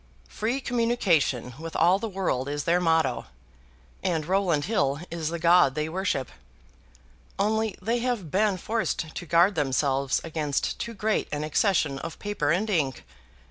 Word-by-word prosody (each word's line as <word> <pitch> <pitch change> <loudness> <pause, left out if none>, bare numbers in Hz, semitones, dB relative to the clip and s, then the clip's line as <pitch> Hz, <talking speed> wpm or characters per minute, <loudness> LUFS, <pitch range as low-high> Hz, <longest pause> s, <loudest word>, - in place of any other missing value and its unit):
Free 235 +6 -2
communication 200 - +1
with 165 0 -7
all 180 +3 +4
the 225 - -3
world 175 -9 -1
is 145 0 -2
their 170 +1 +2
motto, 165 - +1 0.7
and 165 -4 -1
Rowland 180 -5 +1
Hill 145 -10 0
is 165 -2 -2
the 170 - -3
god 170 -4 +4
they 150 0 -1
worship. 160 -7 -2 1.1
Only 220 +1 0
they 230 +5 0
have 235 - -2
been 205 0 +2
forced 200 -6 -2
to 175 - -6
guard 170 +5 +4
themselves 135 -2 +1
against 155 -3 -2
too 230 -1 -5
great 215 +1 0
an 150 0 -2
accession 155 -3 +1
of 165 +2 -7
paper 205 -8 -2
and 185 +7 +1
ink. 150 - 0
170 Hz, 150 wpm, -26 LUFS, 150-205 Hz, 1.1 s, all